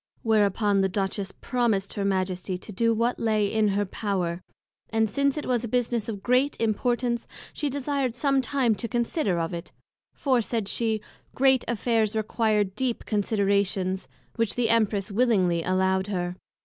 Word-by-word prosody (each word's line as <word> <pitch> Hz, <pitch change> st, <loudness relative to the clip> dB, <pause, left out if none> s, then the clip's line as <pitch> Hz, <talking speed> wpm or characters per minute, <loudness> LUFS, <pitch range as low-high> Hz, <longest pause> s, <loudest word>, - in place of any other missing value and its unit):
Whereupon 205 Hz, -2 st, +3 dB
the 190 Hz, -, +2 dB
Duchess 195 Hz, 0 st, -2 dB
promised 225 Hz, -6 st, 0 dB
her 200 Hz, -, -2 dB
Majesty 185 Hz, -1 st, -1 dB
to 200 Hz, -, -10 dB
do 230 Hz, +4 st, +2 dB
what 230 Hz, +2 st, 0 dB
lay 215 Hz, -2 st, +2 dB
in 215 Hz, +1 st, +2 dB
her 205 Hz, +1 st, +1 dB
power; 185 Hz, -4 st, -2 dB, 0.5 s
and 225 Hz, 0 st, +2 dB
since 280 Hz, +5 st, 0 dB
it 300 Hz, -, -3 dB
was 245 Hz, -2 st, 0 dB
a -, -, -2 dB
business 235 Hz, -1 st, 0 dB
of 205 Hz, -3 st, -5 dB
great 255 Hz, +4 st, +2 dB
Importance, 235 Hz, +2 st, 0 dB, 0.3 s
she 295 Hz, -, -2 dB
desired 275 Hz, -2 st, -1 dB
some 275 Hz, 0 st, +2 dB
time 255 Hz, -2 st, +1 dB
to 230 Hz, +3 st, -4 dB
consider 235 Hz, -, 0 dB
of 165 Hz, +1 st, -2 dB
it; 170 Hz, +1 st, -6 dB, 0.4 s
for, 260 Hz, -4 st, +2 dB
said 225 Hz, -2 st, -2 dB
she, 220 Hz, 0 st, 0 dB, 0.3 s
Great 265 Hz, -1 st, +4 dB
Affairs 225 Hz, -2 st, +1 dB
require 215 Hz, -1 st, +1 dB
deep 235 Hz, +5 st, -3 dB
Considerations; 200 Hz, -3 st, 0 dB, 0.3 s
which 230 Hz, -3 st, 0 dB
the 235 Hz, -2 st, +1 dB
Empress 210 Hz, -3 st, +1 dB
willingly 195 Hz, -7 st, +2 dB
allowed 190 Hz, +2 st, +1 dB
her. 180 Hz, -3 st, -2 dB
220 Hz, 160 wpm, -26 LUFS, 195-240 Hz, 0.5 s, Great